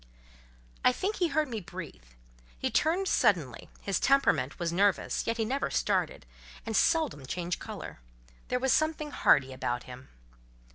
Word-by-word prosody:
I - - +6
think 390 +11 -2
he 355 - +2
heard 310 0 0
me 230 -4 -4
breathe. 175 - -9 0.6
He - - -2
turned 350 +5 +1
suddenly: 155 - +1
his 195 -2 -1
temperament 270 - +2
was 170 -1 -2
nervous, 200 +2 +1
yet 230 +1 0
he 225 - 0
never 270 +5 -1
started, - - 0 0.4
and 225 -1 -3
seldom 315 - +2
changed 175 +3 -3
colour: - - -8 0.5
there 250 - 0
was 260 +1 +2
something 310 -1 0
hardy 135 - +3
about 120 -1 -2
him. 125 +1 -11
220 Hz, 150 wpm, -29 LUFS, -, 0.6 s, I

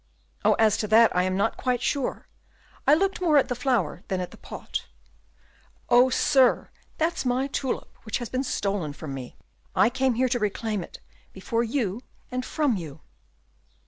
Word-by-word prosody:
"Oh, - - +5
as 220 -2 +3
to 210 - -2
that 225 +2 +5
I 180 - +4
am 185 0 0
not 205 +3 0
quite 250 -1 0
sure; 270 +2 -2 0.6
I 290 - +7
looked 385 +2 0
more 320 -4 +4
at 275 - +3
the 250 - -1
flower 240 - 0
than 190 -2 -1
at 180 - -4
the - - -13
pot." - - -6 1.0
"Oh, 245 +1 +6
sir! 265 -1 +3 0.3
that's 325 +2 0
my 255 +1 +1
tulip, 275 -1 -3
which 220 - -2
has 240 - -5
been 255 +3 -2
stolen 195 - -2
from 150 -1 -7
me. 130 -2 -7 0.4
I 225 - +4
came 260 -1 +1
here 255 +2 +2
to 245 0 0
reclaim 210 -1 -2
it - - -12 0.3
before 230 +5 -1
you 230 -3 -2 0.3
and 255 0 -2
from 280 -5 0
you." 155 -4 -8
235 Hz, 175 wpm, -26 LUFS, 200-260 Hz, 1.0 s, I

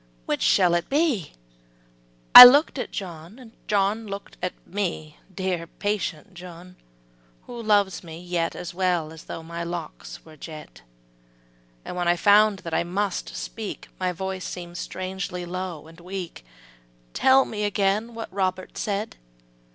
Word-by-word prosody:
Which - - -2
shall 180 -3 +4
it 175 0 -1
be? 280 - 0 1.0
I - - +16
look'd 280 +3 +6
at - - -4
John 190 +6 -9 0.2
John 210 +2 0
look'd 200 0 -8
at 180 - -2
me 170 -6 -4
(Dear, 185 -2 -3
patient 195 -4 -4
John, 180 0 -12 0.7
who 240 -1 -8
loves 205 -5 +1
me 165 -1 -9
yet 175 -1 -2
As 175 - -7
well 175 -4 -1
as 160 - -13
though 165 - -7
my 170 +1 -6
locks 170 -2 -7
were 160 -1 -14
jet); 155 0 -11 1.0
And - - -6
when 175 -1 -2
I 175 - +4
found 205 +2 +4
that 165 - -5
I - - +1
must 190 +2 -3
speak, 220 -3 -7
My 185 -1 0
voice 190 +1 -5
seem'd 175 -1 -7
strangely 185 -1 -5
low 180 -3 -6
and 165 +1 -15
weak: 180 - -7 0.7
``Tell 265 0 +4
me 210 -1 -4
again 205 +3 0
what 225 -4 -7
Robert 185 -1 -3
said?'' 205 +1 -3
185 Hz, 145 wpm, -24 LUFS, 170-205 Hz, 1.0 s, I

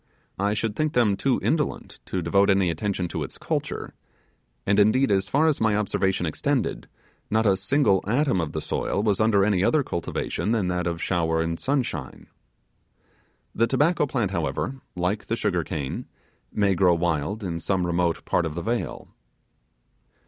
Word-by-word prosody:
I 100 +2 +1
should 110 -1 -2
think 155 +3 0
them 115 -5 +3
too 130 +6 +1
indolent 155 -2 -1
to 90 -2 -2
devote 100 +4 +3
any 95 -3 +3
attention 95 -1 -2
to - - -4
its - - -6
culture; - - -3 0.7
and, 100 +1 +3
indeed, 110 +4 +4
as 95 0 +1
far 145 +7 +3
as 155 -3 +2
my 110 -2 +3
observation 95 -3 0
extended, 80 - -1 0.4
not 110 +1 +2
a 100 -2 +4
single 100 0 +2
atom 125 - +2
of 80 - -3
the - - -3
soil 100 - -1
was 105 -1 +1
under 105 -3 +4
any 100 -3 +2
other 150 +8 +3
cultivation 100 +3 -2
than 100 -6 0
that 90 -1 -1
of 85 0 -3
shower 80 -3 +1
and 85 0 -1
sunshine. 125 - -2 1.3
The 115 - +2
tobacco 150 +4 +2
plant, 120 -8 -1
however, 130 +6 -2
like 90 +4 -1
the - - 0
sugar - - 0
cane, 70 -4 -4 0.4
may 100 -2 +2
grow 90 -1 +4
wild 85 +5 -1
in 85 -3 -3
some 95 0 0
remote 85 -1 0
part 85 - +1
of 75 - -7
the 85 - -4
vale. 120 +1 -3
100 Hz, 170 wpm, -25 LUFS, 90-115 Hz, 1.3 s, indeed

